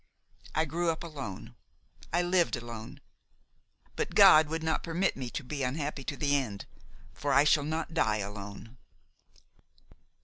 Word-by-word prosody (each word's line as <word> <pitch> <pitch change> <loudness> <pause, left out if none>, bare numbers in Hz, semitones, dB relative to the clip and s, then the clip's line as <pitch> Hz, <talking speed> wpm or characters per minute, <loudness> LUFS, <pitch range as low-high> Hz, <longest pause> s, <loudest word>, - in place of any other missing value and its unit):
I 160 +2 +2
grew 170 +3 -1
up 165 0 -2
alone, 140 - -7 0.6
I 175 +2 +2
lived 175 -3 +2
alone; 115 -2 -8 0.9
but - - -3
God 155 0 +8
would 160 +1 -3
not 160 0 0
permit 175 +3 0
me 130 -2 -5
to 145 - -5
be 140 +2 -5
unhappy 140 +2 -2
to 145 - -4
the 145 -1 +1
end, 110 -8 -2 0.5
for 145 - -2
I 140 +2 +6
shall 150 0 +4
not 160 +2 -3
die 110 -10 +2
alone. 100 +3 -7
145 Hz, 145 wpm, -30 LUFS, 120-160 Hz, 0.9 s, God